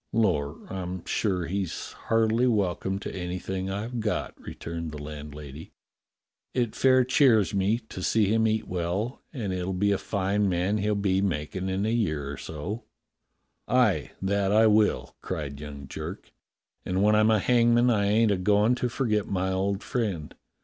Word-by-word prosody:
"Lor', 85 -9 +1 0.2
I'm 90 -1 -5
sure 95 -5 0
he's 95 -1 -3
heartily 115 +2 +1
welcome 95 -4 0
to 100 - -6
anything 95 +1 -3
I've 110 +5 -3
got," 105 -1 -2
returned 85 -1 -6
the 75 - -7
landlady. 75 0 -9 0.8
"It 120 -3 0
fair 130 -1 +5
cheers 125 -6 +4
me 100 +3 +2
up - - -31
to 95 - -7
see 110 +3 +2
him 110 +3 +2
eat 110 0 0
well, 90 +7 -2
and 110 -10 -3
it'll 90 +1 -2
be 100 +2 +2
a 100 - +1
fine 100 0 0
man 90 +4 0
he'll 105 +1 +1
be 95 -1 +1
making 95 +1 -2
in 95 +2 -1
a 110 - +1
year 75 -12 -1
or 70 - -6
so." 90 - -6 0.8
"Aye, 110 - +2
that 100 0 +1
I 110 +2 +5
will," 105 -11 +2
cried 70 -2 -4
young 70 -2 -8
Jerk; - - -7 0.5
"and 95 +1 0
when 105 +1 +5
I'm 110 +1 +4
a 110 - +5
hangman 120 +2 +4
I 105 -3 +2
ain't 110 +1 +3
a 100 - +2
goin' 105 +5 +3
to 125 0 -1
forget 110 -5 0
my 95 -1 -1
old 95 +1 -1
friend. 100 - -2
100 Hz, 170 wpm, -27 LUFS, 90-110 Hz, 0.8 s, fair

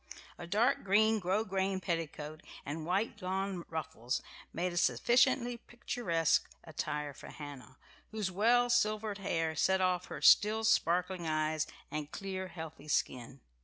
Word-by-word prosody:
A 170 - -7
dark 215 +8 +2
green 215 +3 +4
grosgrain 190 0 0
petticoat 160 -3 -4 0.2
and 155 +3 -5
white 205 +4 -1
lawn 190 -1 -2
ruffles 130 -6 -3 0.3
made 175 +1 -2
a - - -4
sufficiently 240 - +3
picturesque 170 -9 0
attire 150 -2 -4
for - - -12
Hannah, 140 -3 -10 0.3
whose 210 -4 -2
well 235 +6 +4
silvered 215 -2 +1
hair 165 -4 -1
set 190 +5 +3
off 180 -1 +1
her - - -7
still 215 +2 +6
sparkling 180 -4 +2
eyes 155 0 0 0.2
and 150 -1 -4
clear 190 -1 -4
healthy 160 -4 -9
skin. 130 -3 -1
180 Hz, 130 wpm, -33 LUFS, 155-210 Hz, 0.3 s, still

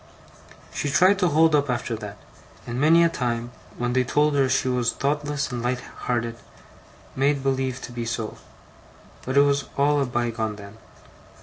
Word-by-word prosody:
'She 145 - -2
tried 185 +8 +4
to 180 - +3
hold 160 +1 +4
up 145 -2 +2
after 120 -1 -1
that; 105 -2 -8 0.5
and 120 +2 -3
many 165 +3 +6
a - - +6
time, 120 -6 -2 0.3
when 120 0 -1
they 130 0 +3
told 150 +4 +2
her 135 -2 +2
she 130 0 +1
was 125 -2 +1
thoughtless 145 -1 -2
and 120 -1 -3
light 125 +1 -1 0.2
hearted, 115 -1 -1 0.8
made 140 +1 +1
believe 130 -2 -1
to - - -8
be 120 -1 -4
so; 115 -1 -4 0.9
but 130 +2 -2
it - - +8
was 140 0 +2
all 145 +1 +3
a - - +1
bygone 115 -3 -2
then. 100 +2 -12
130 Hz, 175 wpm, -24 LUFS, 120-145 Hz, 0.9 s, it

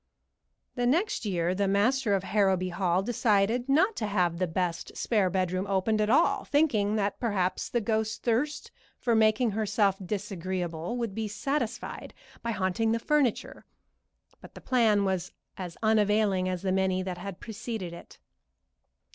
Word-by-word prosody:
The 245 -1 0
next 335 - +1
year 175 -3 0
the 200 +1 0
master 210 +3 +2
of 195 - -1
Harrowby 190 -2 +1
Hall 180 +1 0
decided 230 +2 +1
not 370 +10 +3
to 215 - -1
have 180 -4 0
the 185 - +1
best 175 0 -3
spare 205 -5 +1
bedroom 185 +1 -1
opened 200 +3 +1
at 210 - +1
all, 295 +8 +3
thinking 225 -9 +2
that 205 -2 -1
perhaps 200 -6 -1
the 240 - 0
ghost's 220 0 -1
thirst 295 - -1 0.3
for 235 - 0
making 220 +1 +3
herself 205 -2 +1
disagreeable 185 -1 -3
would 230 -4 -3
be 220 +1 -3
satisfied 240 +2 -3 0.3
by 235 - -4
haunting 220 +2 0
the - - +1
furniture, 270 -1 0 0.8
but - - -14
the - - -9
plan 220 -6 +3
was 190 -1 -2 0.2
as 180 -3 -7
unavailing 210 -3 +2
as 185 -1 -3
the 190 - 0
many 190 0 +1
that 180 -1 -5
had 195 -1 -7
preceded 220 -5 -6
it. 170 - -12
205 Hz, 155 wpm, -28 LUFS, 185-230 Hz, 0.8 s, not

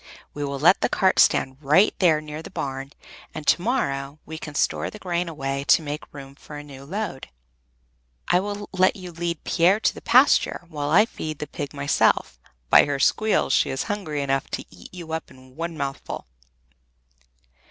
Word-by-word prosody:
We 145 - -4
will 140 -1 -3
let 170 +7 +5
the - - +2
cart 190 -1 +2
stand 130 0 +3
right 155 +9 +4
there 160 -5 +4
near 155 0 -7
the - - -10
barn, 135 0 -5 0.4
and 155 - -6
to 175 - +3
morrow 140 - -1
we 160 0 -7
can 150 -2 -8
store - - 0
the - - -10
grain 175 -3 -2
away 135 -3 -3
to 165 - +5
make 150 0 -6
room 135 -1 -10
for 150 +1 -11
a 145 - -8
new 140 -2 -12
load. 190 -4 -5 1.0
I 180 - +4
will 205 +1 -5
let 185 0 +3
you 185 -2 -9
lead 170 -1 -4
Pier 180 +5 +3
to - - +1
the - - -11
pasture, 255 -7 +4
while 145 -3 -3
I 195 +8 +6
feed 155 -9 -6
the 150 - -4
pig 145 -1 -6
myself; 140 - +1 0.3
by - - +8
her 145 -1 -1
squeals 215 +9 +2
she - - +3
is 135 - -2
hungry 180 -9 -3
enough 135 +1 -1
to - - -4
eat - - -14
you 170 -3 -8
up 160 - -4
in 130 0 -18
one 165 +1 -4
mouthful." 135 -1 -5
155 Hz, 190 wpm, -24 LUFS, 140-180 Hz, 1.0 s, by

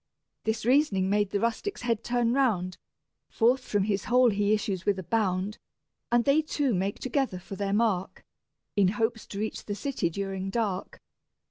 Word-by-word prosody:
This 220 0 -1
reasoning 235 -8 +3
made 205 -1 +2
the 200 - -1
rustic's 235 - -2
head 230 -2 0
turn 240 -1 +1
round; 200 -10 +1 0.5
Forth 250 +3 +2
from 205 -5 0
his 200 -1 -1
hole 250 -1 +5
he 205 0 +1
issues 205 -4 0
with 200 -1 +1
a 190 - -5
bound, 195 +1 0 0.5
And 240 0 +3
they 285 +3 +4
two 290 -4 0
make 195 +2 -1
together 260 -6 -1
for 185 +2 -8
their 200 0 -2
mark, 205 -3 0 0.5
In 200 -2 +4
hopes 225 0 -1
to 200 - -7
reach 215 +1 -3
the 205 - -3
city 210 -5 -1
during 195 +1 -3
dark. 195 -3 -2
210 Hz, 170 wpm, -28 LUFS, 195-240 Hz, 0.5 s, hole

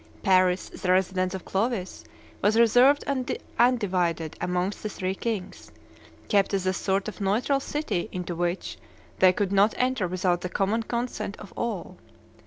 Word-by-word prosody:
Paris, 185 -2 +3
the 180 - -2
residence 185 0 +1
of 190 - -7
Clovis, 200 -1 -2 0.4
was 210 +3 +3
reserved 245 +5 +5
and 265 -3 -2 0.2
undivided 180 -10 +1
amongst 180 +2 -1
the 215 - -3
three 185 -2 -3
kings, 205 - -5 0.6
kept 200 0 +2
as 190 -1 -2
a 185 - +2
sort 195 +2 -1
of 215 - -7
neutral 225 +8 +1
city 275 - -3
into 180 -1 -4
which 175 +2 -3 0.4
they 185 -1 +7
could 195 +1 -1
not 200 +2 +4
enter 255 -6 +1
without 180 0 0
the 180 - -4
common 200 +5 0
consent 230 -3 -3
of 205 - -12
all. 205 -6 -4
195 Hz, 155 wpm, -26 LUFS, 185-225 Hz, 0.6 s, they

